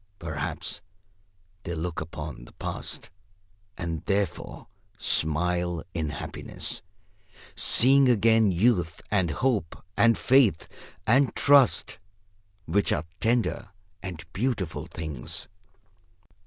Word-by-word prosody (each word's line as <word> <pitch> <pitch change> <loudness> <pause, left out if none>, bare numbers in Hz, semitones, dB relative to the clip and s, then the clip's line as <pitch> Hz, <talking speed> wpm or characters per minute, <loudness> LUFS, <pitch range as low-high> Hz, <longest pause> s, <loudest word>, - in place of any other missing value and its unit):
Perhaps 80 -1 -3 0.8
they 85 -3 -5
look 85 +1 -4
also - - -4
upon - - -8
the - - -17
Past, - - -5 0.7
and 85 -3 -4
therefore 100 -3 -2 0.3
smile 85 +2 0
in 80 -2 -2
happiness, 75 - -5 0.7
seeing 135 +2 +6
again 110 -2 +4
Youth, 90 -3 +1
and 95 -5 +2
Hope, 105 - -1
and 115 -1 +4
Faith, 125 - +3 0.4
and 130 +4 +3
Trust; 140 -3 +4 0.7
which 100 +5 +1
are 80 - 0
tender 115 -4 0 0.3
and 90 -4 -7
beautiful 95 - -2
things. 80 -7 -4
90 Hz, 100 wpm, -26 LUFS, 80-115 Hz, 0.8 s, seeing